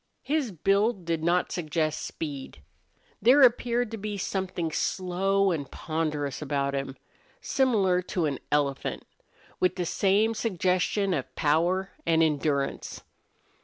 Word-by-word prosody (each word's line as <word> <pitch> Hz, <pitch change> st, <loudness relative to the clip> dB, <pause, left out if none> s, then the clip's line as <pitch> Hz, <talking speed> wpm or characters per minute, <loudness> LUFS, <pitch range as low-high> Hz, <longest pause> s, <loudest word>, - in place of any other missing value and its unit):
His 290 Hz, -6 st, 0 dB
build 195 Hz, +3 st, +1 dB
did 165 Hz, -1 st, -1 dB
not 175 Hz, +2 st, +1 dB
suggest 155 Hz, -2 st, -1 dB
speed. 140 Hz, -, -6 dB, 0.6 s
There 255 Hz, +7 st, +6 dB
appeared 240 Hz, -1 st, +3 dB
to 225 Hz, -, -4 dB
be 210 Hz, 0 st, -4 dB
something 185 Hz, -4 st, -2 dB
slow 190 Hz, +4 st, +1 dB
and 145 Hz, -5 st, -3 dB
ponderous 155 Hz, -4 st, -3 dB
about 140 Hz, -1 st, -1 dB
him, 135 Hz, -1 st, -3 dB, 0.4 s
similar 200 Hz, -9 st, +2 dB, 0.2 s
to 170 Hz, -, +3 dB
an 140 Hz, -3 st, -2 dB
elephant, 145 Hz, -2 st, -1 dB, 0.5 s
with 185 Hz, -1 st, +2 dB
the 180 Hz, -2 st, -2 dB
same 205 Hz, +6 st, +2 dB
suggestion 190 Hz, -2 st, 0 dB
of 130 Hz, -4 st, -4 dB
power 170 Hz, +5 st, +1 dB
and 165 Hz, -1 st, +3 dB
endurance. 145 Hz, -2 st, -1 dB
180 Hz, 125 wpm, -27 LUFS, 150-195 Hz, 0.6 s, There